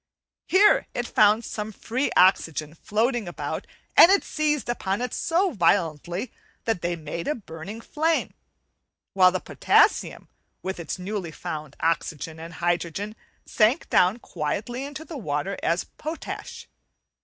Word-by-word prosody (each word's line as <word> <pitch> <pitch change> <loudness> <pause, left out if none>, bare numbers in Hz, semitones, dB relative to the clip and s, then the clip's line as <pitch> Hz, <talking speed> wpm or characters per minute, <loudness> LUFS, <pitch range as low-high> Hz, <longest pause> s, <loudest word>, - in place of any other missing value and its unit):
Here 400 +3 +5
it 240 - -1
found 215 +2 +4
some 215 0 -4
free 245 +6 -2
oxygen 165 -5 +3
floating 220 +5 -1
about, 175 - -5 0.3
and 345 - +9
it 400 - +4
seized 300 -2 -1
upon 200 -5 -1
it 250 -1 -3
so 355 +3 +1
violently, 175 - 0 0.3
that 225 -7 0
they 175 0 -1
made 165 +1 -6
a 300 - +1
burning 195 +1 -8
flame, 320 +6 0 0.8
while 185 -1 +6
the 185 - -1
potassium - - +2 0.4
with 190 -1 -4
its 165 +1 -4
newly 185 -1 -4
found 155 -2 -6
oxygen 160 -1 -1
and 165 +1 -9
hydrogen 175 +5 -2 0.3
sank 230 +9 +2
down 185 +5 +4
quietly 240 - -4
into 290 +2 -7
the 320 - -7
water 150 +1 -2
as 170 +2 +1
potash. 465 +9 -7
200 Hz, 135 wpm, -25 LUFS, 170-250 Hz, 0.8 s, and